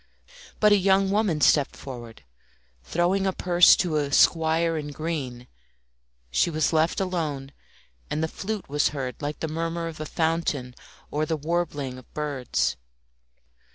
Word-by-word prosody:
But 210 -1 +5
a 205 - +7
young 195 0 +3
woman 200 -7 +1
stepped 140 +1 +4
forward, 120 -4 -9 0.6
throwing 180 - +1
a - - +2
purse 175 -1 +6
to 170 -4 0
a 145 -1 -1
squire 165 +2 +3
in 150 -2 -3
green. 145 -5 -4 0.9
She 60 - +2
was 155 0 0
left 160 +1 +2
alone, 155 -8 -2 0.6
and 155 - -1
the - - +1
flute 205 +4 -5
was 145 +1 +2
heard 130 0 -4
like 145 +1 -4
the 160 - -1
murmur 165 +1 -3
of 160 -2 -8
a 155 - -4
fountain 160 -6 -1 0.4
or 155 +1 -1
the 160 - -1
warbling 150 -5 -2
of 130 - -19
birds. 145 -5 -1
160 Hz, 150 wpm, -25 LUFS, 145-175 Hz, 0.9 s, a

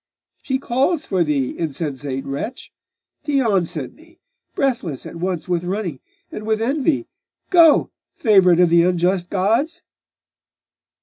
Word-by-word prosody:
'She 265 - -1
calls 275 +5 0
for 185 -3 +1
thee, 145 -5 -1
insensate 140 -4 -4
wretch! 140 - -6 0.5
Theon 230 - +1
sent 155 -6 -6
me 330 +2 -21 0.4
breathless 235 - -1
at - - -8
once 180 0 -3
with 175 -1 -1
running 180 -6 -3 0.3
and 215 - -7
with 220 0 0
envy 275 +6 0 0.4
Go! 335 -4 +5 0.2
favourite 190 -6 +4
of 175 -2 +4
the 170 0 +6
unjust 180 +1 +1
gods! 225 - 0
190 Hz, 125 wpm, -20 LUFS, 170-260 Hz, 0.5 s, the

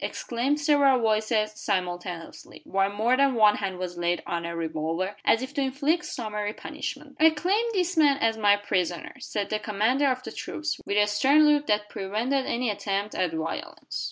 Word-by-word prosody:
exclaimed 255 +5 -1
several 285 -3 +4
voices 215 -1 +1
simultaneously; 180 -4 -4
while 195 0 +1
more 220 +5 +2
than 275 -1 +3
one 210 -2 +5
hand 190 -2 -3
was 180 -1 -5
laid 175 0 0
on 170 0 -3
a 170 - -5
revolver, 165 +4 -2
as 225 - +3
if 260 +2 -7
to 285 - -1
inflict 285 +6 0
summary 210 -3 -4
punishment. 295 0 -7
"I 320 +1 +7
claim 370 +9 0
this 365 -2 0
man 290 -3 +4
as 225 -5 +1
my 205 -2 +4
prisoner," 185 -4 -2
said 210 -5 -4
the 215 - 0
commander 220 +7 +1
of 255 0 -2
the - - -7
troops, 315 0 -4
with 200 - 0
a 210 - +5
stern 265 +9 +4
look 295 0 +3
that 210 0 +1
prevented 225 +8 -2
any 240 -1 0
attempt 200 0 -3
at 180 -3 0
violence. 160 0 -5
215 Hz, 185 wpm, -26 LUFS, 195-275 Hz, -, I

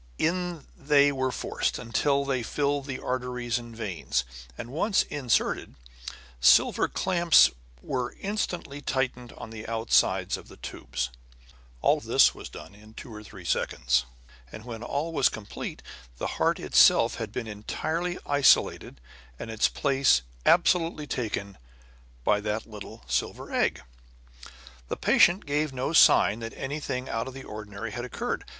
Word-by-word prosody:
In 175 -2 -1
they 145 0 +4
were 130 -1 -1
forced, - - -2
until 140 +4 0
they 135 -2 0
filled 145 +3 -1
the 130 -2 -4
arteries 125 -2 -2
and 120 -1 -11
veins; 95 - -2 0.3
and 120 - -7
once 190 +8 +2
inserted, 130 -5 -1 0.6
silver 60 - +5
clamps 175 -3 +4 0.3
were 125 -2 -3
instantly 180 -8 -3
tightened 125 -3 -2
on 110 - -10
the 110 -1 -8
outsides 115 0 +2
of - - -13
the - - -14
tubes. 65 0 -5 0.7
All - - +3
this - - +4
was - - -9
done - - -11
in 110 +2 -17
two 115 - -9
or 105 - -8
three 105 - -12
seconds; 60 0 +1 0.5
and 110 - -10
when 115 -2 -7
all 145 +7 -3
was 140 -4 +4
complete, 105 -2 -7 0.3
the - - -4
heart - - +2
itself - - +5
had - - -5
been 125 - -4
entirely 160 - -3
isolated 140 - +3 0.4
and 115 - -7
its 110 0 +3
place 135 - +2 0.2
absolutely 170 -3 +3
taken 105 - -4 0.6
by 105 +10 +3
that 105 +1 -2
little 105 - -10
silver 65 - -2
egg. - - +1 1.0
The - - -4
patient 175 +4 +4
gave 150 0 0
no 130 +4 -3
sign 115 -8 +6
that 115 0 -7
anything 135 -2 -4
out 115 +2 -2
of 130 - -8
the 135 - -8
ordinary 105 +1 -7
had 120 +2 -5
occurred. 125 - -4
125 Hz, 145 wpm, -27 LUFS, 110-145 Hz, 1.0 s, sign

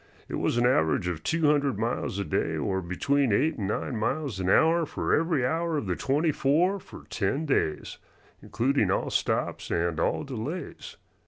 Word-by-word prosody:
It - - -9
was - - 0
an 120 - +3
average 90 -8 +2
of 85 -3 -3
two 165 - 0
hundred 145 -5 +2
miles 115 -3 -2
a 100 - -2
day, 75 - -1
or 95 0 -1
between 130 +9 0
eight 140 +7 +1
and 100 - -2
nine 110 +5 -2
miles 115 0 -2
an 95 0 -1
hour 165 - +4
for - - -1
every 160 -5 +2
hour 165 +3 0
of 140 - -2
the 90 -2 -1
twenty 150 - +1
four 170 +9 +2
for - - -13
ten 125 +9 -1
days, 80 - -1 0.4
including 120 -3 0
all 95 - 0
stops - - -1
and 85 -1 0
all 85 - 0
delays. 140 +5 -6
130 Hz, 180 wpm, -27 LUFS, 95-155 Hz, 0.4 s, hour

